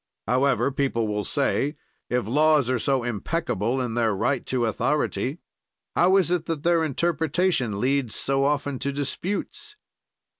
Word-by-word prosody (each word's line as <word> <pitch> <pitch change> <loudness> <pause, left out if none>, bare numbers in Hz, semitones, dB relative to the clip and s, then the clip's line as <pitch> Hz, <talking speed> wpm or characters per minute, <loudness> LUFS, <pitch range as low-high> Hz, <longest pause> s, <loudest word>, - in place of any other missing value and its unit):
However, 135 +2 +2
people 130 -5 0
will 105 0 -2
say, 145 +3 0 0.3
if 125 -2 0
laws 145 +1 +3
are 130 - +1
so 135 +1 +1
impeccable 120 - -1
in 125 -3 -2
their 115 -3 +1
right 135 +6 0
to 125 -2 0
authority, 135 +5 -1 0.5
how 185 +2 +5
is 180 -3 +2
it 175 -2 0
that 160 -3 -3
their 170 -1 +3
interpretation 160 - 0
leads 130 -2 0
so 135 0 +1
often 140 -2 0
to 140 - -1
disputes? 185 - -4
140 Hz, 145 wpm, -25 LUFS, 125-155 Hz, 0.5 s, how